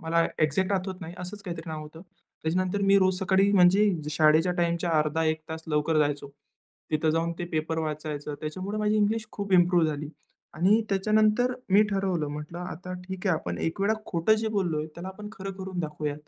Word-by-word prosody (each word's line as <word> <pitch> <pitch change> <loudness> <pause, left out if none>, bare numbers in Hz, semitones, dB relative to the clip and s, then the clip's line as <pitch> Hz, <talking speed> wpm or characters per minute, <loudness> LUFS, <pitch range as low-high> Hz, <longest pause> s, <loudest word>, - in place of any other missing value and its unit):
मला 165 0 +2 0.2
एक्झॅक्ट 185 +6 +2
आठवत 185 0 -2
नाही, 170 0 -7
असंच 185 +3 -7
काहीतरी 170 -4 -6
नाव 155 -1 -5
होतं. 155 +2 -11 0.4
त्याच्यानंतर 185 +4 0
मी 195 - +6
रोज 185 -1 +2
सकाळी 195 +1 +3
म्हणजे 195 +2 +5 0.2
शाळेच्या 155 +3 +4
टाईमच्या 170 0 0
अर्धा 155 +1 +1
एक 155 0 0
तास 160 0 -5
लवकर 155 0 +1
जायचो. 145 -1 0 0.6
तिथं 155 0 +2
जाऊन 165 +1 0
ते 175 - -2
पेपर 160 +1 -1
वाचायचो. 150 -1 -4
त्याच्यामुळे 185 +8 -5
माझी 210 0 +1
इंग्लिश 215 +1 +1
खूप 200 -2 -4
इम्प्रूव्ह 175 -2 +5
झाली 150 -1 -3 0.5
आणि 195 +8 +3
त्याच्यानंतर 215 +5 +2 0.2
मी 200 +3 +6
ठरवलं. 190 -5 0
म्हटलं 150 +3 -6
आता 180 0 -6 0.2
ठीक 190 +1 -5
आहे, 185 - +4
आपण 85 - -5
एक 165 +5 -2
वेळ 200 +2 +3
खोटं 170 +5 +2
जे 220 0 -1
बोललोय 155 -5 -1
त्याला 175 +2 -7
आपण 210 +2 -8
खरं 195 -2 -6
करून 190 -1 -6
दाखवूया. 150 -2 -3
175 Hz, 185 wpm, -27 LUFS, 155-195 Hz, 0.6 s, मी